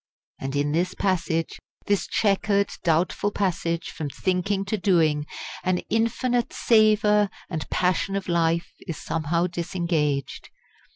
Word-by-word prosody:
And 135 +1 -4
in 145 +1 +1
this 180 +4 0
passage, 165 -4 -1 0.3
this 205 -1 +1
chequered, 200 -1 +1
doubtful 170 +4 +1
passage 170 -4 -1
from 150 -2 -5
thinking 190 +5 -1
to 195 - -1
doing, 160 -7 +2 0.4
an 185 -1 +1
infinite 235 +2 +1
savour 210 -2 +4 0.2
and 160 -3 -4
passion 185 +2 +1
of 195 -1 -3
life 170 -1 +1 0.2
is 165 - -4
somehow 165 +2 0
disengaged. 170 -5 -2
180 Hz, 120 wpm, -25 LUFS, 165-200 Hz, 0.4 s, savour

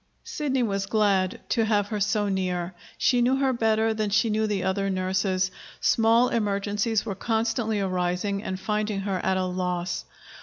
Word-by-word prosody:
Sidney 295 - -1
was 195 -3 -1
glad 200 -3 +1
to 230 - +2
have 205 -2 +1
her 210 - -2
so 210 +1 +1
near. 185 -2 -2 0.2
She 245 -1 +3
knew 250 +2 +3
her 270 -1 +1
better 225 -1 +2
than 215 -1 -1
she 210 +3 +2
knew 215 +1 +1
the 205 -3 -1
other 195 +1 0
nurses. 185 0 0 0.3
Small 230 +2 +4
emergencies 205 0 0
were 200 - -2
constantly 225 +1 -1
arising 185 +1 -1
and 190 -3 -4
finding 210 0 -1
her 195 -2 -2
at 190 - +1
a 185 - 0
loss. 180 0 -2
205 Hz, 165 wpm, -26 LUFS, 190-225 Hz, 0.3 s, Small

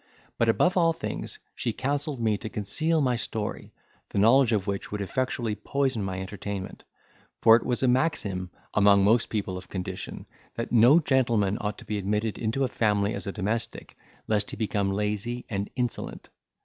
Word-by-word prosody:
But, 115 - +3
above 180 +11 +3
all 165 -2 +4
things, - - -5 0.2
she 115 - -2
counselled 140 +2 -2
me 110 -2 +2
to 110 - -5
conceal 155 +12 0
my 125 -3 +2
story, 105 -1 -4 0.4
the - - -5
knowledge 120 +5 +5
of 105 -4 +1
which 100 -1 -3
would 105 - -3
effectually 120 +2 -1
poison 135 0 -1
my 95 -1 -3
entertainment; 95 0 -6 0.6
for 115 - +8
it 115 - +1
was 125 +1 -1
a - - +4
maxim, 110 - 0 0.2
among 100 -1 +5
most 110 +3 +3
people 100 -4 -2
of 90 - -15
condition, 90 -2 -5 0.3
that 115 - -4
no 125 +7 +7
gentleman 115 - +1
ought 105 0 -3
to - - -11
be 105 -1 -2
admitted 105 +2 -1
into 115 +4 0
a - - +2
family 105 -3 +1
as 120 - -5
a - - -1
domestic, 110 +4 -3 0.3
lest 105 -2 +1
he - - -4
become 100 -2 0
lazy, 105 +4 -2
and 100 0 -2
insolent. 125 -2 -4
110 Hz, 175 wpm, -27 LUFS, 100-125 Hz, 0.6 s, for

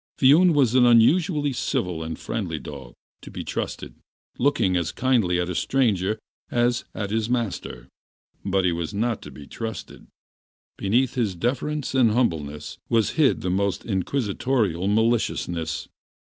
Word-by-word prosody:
Viun 155 +6 +6
was 130 -5 +3
an 130 -1 +5
unusually 145 +5 +4
civil 90 -8 -2
and 80 0 -5
friendly - - -4
dog, 65 -4 -9 1.4
looking 120 -8 +2
as 85 -2 0
kindly 115 -9 +1
at 90 - -1
a 90 - -3
stranger 110 -3 +1 0.3
as 120 0 +1
at 105 -2 -3
his 110 +1 0
masters, 95 - -3 0.6
but 95 -1 +1
he 90 - +3
was 85 +2 -4
not 115 +1 -1
to - - -9
be 70 +1 -11
trusted. 115 +8 -7 0.7
Beneath 120 +6 +1
his 110 -7 -1
deference 140 - -2
and 120 -5 +4
humbleness 75 - -2
was 115 -3 +2
hid 155 -4 +2
the 90 - -1
most 100 -1 -1
inquisitorial 105 -2 -1
maliciousness. 105 -7 0
110 Hz, 130 wpm, -24 LUFS, 90-125 Hz, 1.4 s, Viun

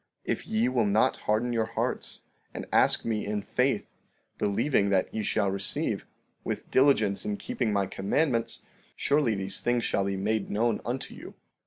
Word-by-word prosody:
—If - - -2
ye 110 +2 +1
will 125 -4 +1
not 100 +2 +3
harden 115 +3 +2
your 110 -1 +1
hearts, - - -2 0.3
and - - -5
ask - - +4
me 110 -2 -1
in 105 0 -2
faith, - - 0 0.5
believing 100 +1 +1
that 95 -2 +1
ye 110 - -1
shall 100 -1 +1
receive, 100 - -1 0.4
with - - -5
diligence 120 -8 +3
in 105 -1 -2
keeping 115 +1 -2
my 100 -1 +1
commandments, 115 - -1 0.3
surely 140 -6 +2
these 95 0 0
things 120 -1 0
shall 100 - +1
be 100 0 -1
made 105 +2 -1
known 115 +2 0
unto 125 +2 -4
you. - - -11
110 Hz, 165 wpm, -28 LUFS, 100-120 Hz, 0.5 s, ask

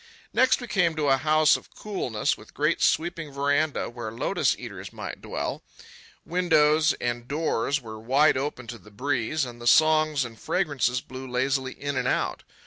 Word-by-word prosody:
Next 260 0 +4
we 245 - -6
came 175 -6 +1
to 150 -2 0
a 135 - +5
house 155 +2 +4
of - - -9
coolness, 130 - -2
with - - -17
great - - +1
sweeping 165 -2 0
veranda, 145 +2 0
where 120 -2 -6
lotus 115 - 0
eaters - - -8
might - - -7
dwell. - - -4 0.6
Windows 155 -3 +3
and 120 0 -3
doors 145 -2 0
were 110 -3 -9
wide 135 +7 +3
open 130 -2 -3
to 115 0 -8
the 105 - -17
breeze, 130 +5 -1
and 120 -1 -10
the 120 - -4
songs 155 -1 +4
and 115 -2 -10
fragrances 135 -8 0
blew 130 0 -9
lazily 130 +1 0
in 145 0 -4
and 125 0 0
out. - - -1
140 Hz, 170 wpm, -26 LUFS, 125-155 Hz, 0.6 s, a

